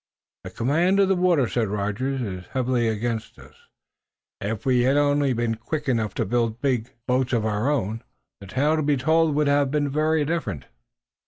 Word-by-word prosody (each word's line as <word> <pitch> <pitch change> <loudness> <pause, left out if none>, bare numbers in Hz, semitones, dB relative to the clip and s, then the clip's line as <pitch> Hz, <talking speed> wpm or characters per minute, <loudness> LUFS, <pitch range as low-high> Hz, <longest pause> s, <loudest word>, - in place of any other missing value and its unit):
"The - - -7
command 170 +10 +1
of 195 -1 +4
the 190 - +3
water," 175 -8 +2
said 115 -1 -1
Rogers, 105 +7 -2
"is 95 -4 -6
heavily 125 -2 +1
against 110 0 -3
us. - - -15 0.9
If 105 +1 -4
we 125 -2 +3
had 135 +3 +3
only 145 -1 +2
been 120 -1 0
quick 145 +7 -5
enough 115 -5 0
to 115 - 0
build 115 +1 0
big 125 -3 0 0.2
boats 125 0 0
of 115 -2 +1
our 110 +4 0
own, 115 -5 -1 0.4
the 100 - -11
tale 145 +9 +1
to - - +1
be 145 -1 +1
told 160 +3 +2
would 150 0 +2
have 140 -1 +2
been 145 0 0
very 155 +1 +1
different." 110 - -3
130 Hz, 185 wpm, -24 LUFS, 115-145 Hz, 0.9 s, of